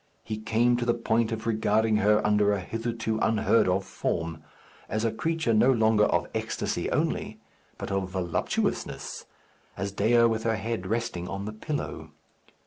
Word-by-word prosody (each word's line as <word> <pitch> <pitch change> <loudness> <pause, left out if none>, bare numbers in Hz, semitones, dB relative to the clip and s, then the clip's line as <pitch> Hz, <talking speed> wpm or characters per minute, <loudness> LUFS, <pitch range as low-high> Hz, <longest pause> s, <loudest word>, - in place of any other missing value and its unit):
He 110 - -4
came 115 +2 +2
to 120 - -1
the 120 0 +2
point 115 -1 +1
of 110 0 -4
regarding 110 -1 +2
her 105 0 +3
under 105 -1 +3
a 100 - 0
hitherto 115 +2 -3
unheard 110 0 +3
of 95 +1 0
form; 80 -1 -3 0.5
as 110 +2 -1
a 115 - +2
creature 160 +1 0
no 115 +5 +5
longer 110 -3 +4
of - - +1
ecstasy - - -2
only, - - -1 0.4
but - - -5
of 95 -1 -1
voluptuousness; 90 -3 -2 0.5
as 100 +2 -3
Dea, 115 +4 +3
with 115 -1 +2
her 115 0 +1
head 110 -2 -3
resting 110 -5 -2
on 100 +3 -4
the 105 - -5
pillow. 145 +7 -5
110 Hz, 160 wpm, -27 LUFS, 100-115 Hz, 0.5 s, no